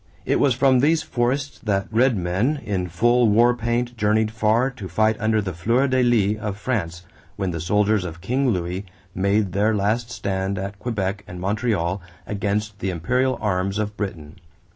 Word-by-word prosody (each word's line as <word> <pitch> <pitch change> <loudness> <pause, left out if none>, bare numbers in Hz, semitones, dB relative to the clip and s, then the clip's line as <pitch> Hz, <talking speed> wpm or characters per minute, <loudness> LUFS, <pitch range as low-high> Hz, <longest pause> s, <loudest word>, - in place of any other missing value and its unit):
It - - +1
was 130 -4 +3
from 130 0 +4
these 155 +4 +3
forests 130 +2 -1
that 100 -3 0
Red 120 +1 +3
Men 95 - 0
in 95 -4 -1
full 120 +7 +3
war 120 +3 +4
paint 120 +1 -1
journeyed 110 0 +1
far 110 +4 +2
to 110 -7 -8
fight 110 +5 +2
under 110 0 +1
the 90 -2 -4
fleur 115 +11 +1
de 130 -1 +2
lis 110 -4 +2
of 100 -2 -3
France 90 -8 -3 0.3
when 95 -2 -2
the 85 - -4
soldiers 105 +3 +2
of 85 -1 -6
King 125 +9 0
Louis 90 -1 -2 0.3
made 100 +1 +1
their 105 +4 +2
last 110 +4 0
stand 95 -3 -2
at 100 +1 -5
Quebec 100 -4 -2
and 90 - -8
Montreal 100 -2 -1 0.2
against 105 0 -2
the 95 - -2
imperial 125 +10 0
arms 100 -1 0
of 105 -1 -2
Britain. 85 -8 -6
105 Hz, 175 wpm, -23 LUFS, 95-120 Hz, 0.3 s, from